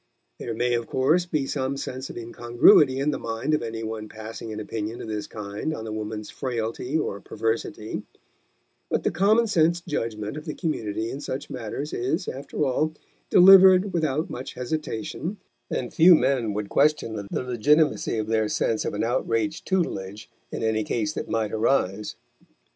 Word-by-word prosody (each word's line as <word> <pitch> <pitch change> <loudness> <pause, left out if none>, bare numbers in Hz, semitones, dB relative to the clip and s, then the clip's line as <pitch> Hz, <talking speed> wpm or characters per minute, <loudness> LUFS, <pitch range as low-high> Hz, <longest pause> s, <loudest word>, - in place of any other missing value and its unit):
There 115 - -4
may 120 +1 +1
of 120 -1 -1
course 160 +7 +2
be 150 -5 0
some 135 0 -2
sense 130 -1 -5
of - - -8
incongruity 120 +3 +4
in 140 +2 +1
the - - -3
mind 115 +6 -2
of 150 - +2
any 115 0 -5
one 110 -1 -5
passing 110 +1 -8
an 110 - -5
opinion 110 +1 -4
of - - -7
this 105 -1 -4
kind 105 +9 -4
on 110 - -6
the 110 - -5
woman's 105 0 -5
frailty 125 +2 -2
or 100 -9 -2
perversity; 110 -1 -3 0.9
but - - 0
the - - +1
common 215 +5 +3
sense 170 -5 +2
judgment 115 -7 -4
of 155 - -8
the 155 - -4
community 110 - -2
in 140 - -6
such 135 -1 -5
matters 130 +4 -5
is, 140 +10 -1
after 140 +2 -3
all, 155 +4 0 0.4
delivered 190 +1 +8
without 155 -2 0
much 130 +2 -7
hesitation, 155 - -4 0.3
and 125 - -3
few 175 +2 +8
men 125 -8 +1
would 105 -1 -3
question 145 -6 +2
the - - -2
legitimacy 135 +3 +2
of 110 - -1
their 110 -1 +1
sense 110 0 0
of - - -2
an 105 - -1
outraged 120 +5 -1
tutelage 105 - -2 0.2
in - - -4
any 110 -1 +1
case 105 -1 -1
that - - -5
might 110 -2 0
arise. 105 -3 0
120 Hz, 170 wpm, -25 LUFS, 110-150 Hz, 0.9 s, delivered